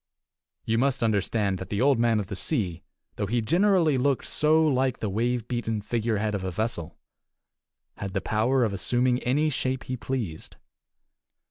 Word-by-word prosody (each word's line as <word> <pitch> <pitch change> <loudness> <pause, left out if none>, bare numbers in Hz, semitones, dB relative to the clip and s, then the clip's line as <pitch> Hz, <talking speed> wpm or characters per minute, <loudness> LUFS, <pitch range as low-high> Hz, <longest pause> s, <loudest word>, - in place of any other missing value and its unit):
You 115 0 +1
must 135 -1 +1
understand 100 -2 0
that 95 - -7
the 100 - -2
Old 135 -1 +3
Man 115 -2 +3
of 105 - -2
the 100 - -6
Sea, 95 - -1 0.4
though 100 - -1
he 120 +4 0
generally 170 - +3
looked 140 0 +1
so 155 +1 +3
like 130 -3 +1
the 105 - -3
wave 120 +2 -1
beaten 120 -3 -2
figurehead 110 0 -1
of 100 -2 -2
a 95 - -2
vessel, 85 -4 -3 1.0
had 100 -1 -5
the 95 - +1
power 115 +7 +1
of 110 -4 0
assuming 125 +5 +1
any 150 +6 +1
shape 130 -1 -2
he 130 - -4
pleased. 115 -11 -5
115 Hz, 165 wpm, -26 LUFS, 105-130 Hz, 1.0 s, Old